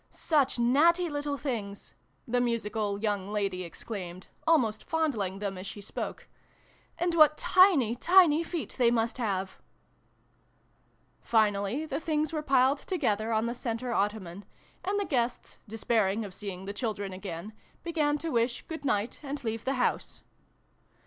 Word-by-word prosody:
" - - -40
Such 290 -6 +1
natty 325 +9 +4
little 290 -1 -2
things! 215 -8 -5 0.2
" 135 - -41
the 245 +1 +1
musical 220 -3 -1
young 205 -2 -1
lady 195 -3 -1
exclaimed, 180 0 -7 0.2
almost 245 -10 +3
fondling 240 -13 -1
them 195 -2 -4
as 190 - -7
she 205 - -7
spoke. 200 - -6 0.7
"And 350 0 0
what 305 -2 +6
tiny 340 - +5
tiny 335 +2 +5
feet 335 -1 -5
they 240 -2 +5
must 230 +1 0
have! 195 -4 -2 0.8
" - - -39
Finally, 215 +5 +1
the 285 -2 -3
things 310 -1 -1
were 310 - -1
piled 270 -1 +3
together 220 - -1
on 220 0 +1
the 235 - -1
centre 240 0 -3
ottoman, 200 -2 -2 0.4
and 395 +3 0
the 405 - -1
guests, 245 -6 -2
despairing 220 -1 0
of 195 - -9
seeing 190 -2 -7
the 200 - -5
children 205 -4 -3
again, 185 +1 -7 0.3
began 305 -3 +1
to 325 +2 -4
wish 235 0 0
good 320 -2 -7
night 215 -4 -1
and 285 -1 -5
leave 225 -1 -3
the 270 - +1
house. 250 - -1
235 Hz, 155 wpm, -29 LUFS, 205-295 Hz, 0.8 s, what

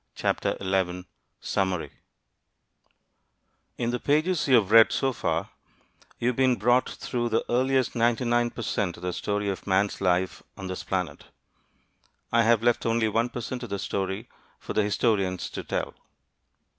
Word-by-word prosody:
Summary 95 -3 -1 1.9
In 120 0 -1
the 125 - -2
pages 155 +5 +1
you 130 - +6
have 105 -4 +3
read 115 0 +8
so 135 -1 0
far, - - -2 0.7
you 120 - +1
have 125 - -1
been 130 -1 +3
brought 120 +4 +2
through 120 -1 -3
the 115 - 0
earliest 130 +1 +2
99 120 0 +2
per 115 - -7
cent 95 -5 -1
of 85 - -13
the 90 0 -2
story 105 +2 -2
of 100 0 -4
man's 100 +1 +1
life 90 0 +1 0.2
on 95 - -7
this 95 0 -5
planet. 90 -6 -3 1.1
I 115 - +4
have 115 0 +3
left 120 -1 +2
only 115 -1 +2
1 115 +3 +1
per 120 - -5
cent 125 +2 -5
of 120 - -6
the 100 - -2
story 95 +3 -3 0.3
for - - -7
the - - +3
historians 100 -3 0
to - - -5
tell. - - -3
115 Hz, 155 wpm, -26 LUFS, 95-120 Hz, 1.9 s, read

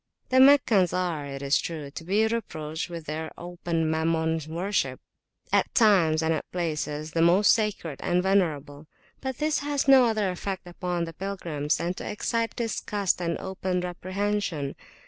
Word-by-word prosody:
The 260 - +4
Meccans 250 - +5
are, 175 -5 -1
it 135 0 -6
is 140 +1 +3
true, 155 -4 -6
to 165 - -8
be 200 +6 +2
reproached 165 -9 -3
with 170 -2 -7
their 155 +1 -4
open 170 -2 -2
Mammon 160 0 0
worship, 185 +5 -1 0.5
at - - +3
times 175 -9 +4
and 160 0 +2
at 155 - -5
places 155 -3 -3
the 165 - 0
most 180 +5 +5
sacred 205 -9 -2
and 180 +1 +1
venerable; 155 -6 0 0.3
but 265 -2 -4
this 305 0 +1
has 285 -1 -1
no 265 -2 +8
other 215 -4 +1
effect 185 +1 -5
upon 175 0 -3
the 165 - -8
pilgrims 165 -5 -2
than 170 +2 -2
to - - -6
excite 230 +2 -1
disgust 205 -5 -1
and 170 -1 -1
open 190 -1 -2
reprehension. 185 -4 -2
175 Hz, 160 wpm, -26 LUFS, 160-205 Hz, 0.5 s, no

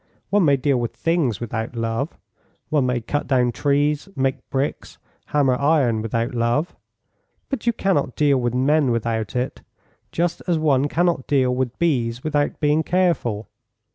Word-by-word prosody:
One 200 -3 +4
may 140 -2 +4
deal 135 -1 +1
with 120 -1 -3
things 165 - 0
without 115 0 -4
love. 115 +6 -2 0.5
One 145 -4 +2
may 125 -1 0
cut 145 +6 -2
down 125 -3 +2
trees, 145 - 0
make 135 0 -2
bricks, 135 +2 -3 0.3
hammer 140 -3 +2
iron 140 -5 +2
without 115 +3 -2
love; 120 +8 0 0.7
but 275 -3 -4
you 235 - +4
cannot 180 - 0
deal 145 -3 +3
with 120 0 -1
men 140 +2 +3
without 115 -2 -1
it, 125 +1 -2 0.5
just 175 +1 -1
as 175 -2 +2
one 145 -3 +2
cannot 170 -3 0
deal 130 -3 +2
with 125 -1 -2
bees 125 -8 0
without 145 -2 0
being 150 +1 +2
careful. 165 - 0
135 Hz, 155 wpm, -22 LUFS, 120-155 Hz, 0.7 s, One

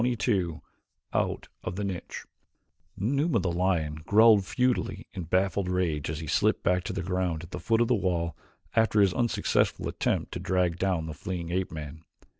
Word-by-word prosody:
Chapter 120 -3 +1 0.2
XXII 80 -1 -7 0.5
Out - - -1 0.2
of 90 - -4
the 105 - -3
Niche 95 -3 -5 0.7
Numa, 140 - +1
the 90 -2 -1
lion, 85 -4 0
growled 110 -1 +6
futilely 125 -5 0
in 90 -4 -5
baffled 95 +2 +1
rage 85 -6 0
as 75 - -3
he 80 - -5
slipped - - +1
back 90 0 +2
to - - -2
the 95 -1 -3
ground 90 -3 -1
at 85 - -11
the - - -5
foot 115 0 +2
of 120 - +3
the 125 - +3
wall 85 -6 0 0.4
after 110 -2 +3
his 95 -3 +4
unsuccessful 120 +3 +1
attempt - - -1
to - - -4
drag 90 -1 0
down 90 -4 0
the 80 - -5
fleeing 85 +2 -5
ape 95 +1 -1
man. 80 0 -7
90 Hz, 185 wpm, -28 LUFS, 85-100 Hz, 0.7 s, growled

